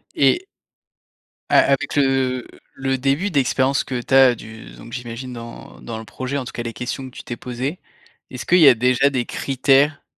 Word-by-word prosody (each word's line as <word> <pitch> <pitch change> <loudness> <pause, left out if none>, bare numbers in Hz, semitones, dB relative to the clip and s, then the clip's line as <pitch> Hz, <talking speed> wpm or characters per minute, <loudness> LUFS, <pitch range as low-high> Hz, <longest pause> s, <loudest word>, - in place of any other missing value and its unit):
Et 355 +2 +3 1.0
a - - +4
avec 140 -1 +1
le, 135 -3 +1 0.3
le 135 0 -1
début 140 +10 0
d'expérience 135 -1 +1
que 125 -2 -4
tu 130 - -5
as 135 -2 +7
du, 110 0 -11
donc 120 - -13
j'imagine 125 0 -6
dans 115 - -10
dans 65 - -6
le 110 - -8
projet, 130 +5 -4
en 135 - -4
tout - - -7
cas 120 - -4
les 115 -1 -5
questions 125 +4 -5
que 130 - -21
tu - - -9
t'es 120 - -6
posées, 130 +8 -4 0.5
est-ce 125 - -7
qu'il 180 - +4
y 155 - +8
a - - +7
déjà 125 +3 +2
des 130 -3 -2
critères, 135 +2 +1
130 Hz, 195 wpm, -21 LUFS, 120-135 Hz, 1.0 s, y